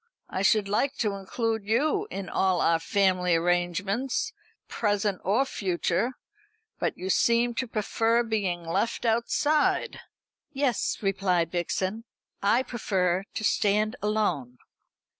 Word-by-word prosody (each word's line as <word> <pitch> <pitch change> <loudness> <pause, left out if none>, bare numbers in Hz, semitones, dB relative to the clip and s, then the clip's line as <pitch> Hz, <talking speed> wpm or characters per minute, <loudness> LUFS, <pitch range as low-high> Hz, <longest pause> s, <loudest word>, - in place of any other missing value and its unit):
I 190 - -2
should 200 +1 +3
like 245 +8 0
to 210 -3 0
include 220 +3 -2
you 305 - +1
in 195 -2 -5
all 190 -2 +1
our 165 0 +3
family 185 -1 +2
arrangements, 180 - 0 0.3
present 205 -3 -1
or 220 +9 +2
future; 190 +1 -1 0.7
but - - -1
you 185 +1 -2
seem 235 +3 +3
to 255 +2 -2
prefer 225 +2 +1
being 200 -6 -1
left 225 +8 -1
outside." 260 +6 +1 0.5
"Yes," 270 -4 0
replied 185 -4 +1
Vixen, 185 +5 -2 0.4
"I 230 +6 +3
prefer 190 -6 -1
to - - -3
stand 210 +2 +2
alone." 180 - -1
205 Hz, 120 wpm, -27 LUFS, 185-230 Hz, 0.7 s, should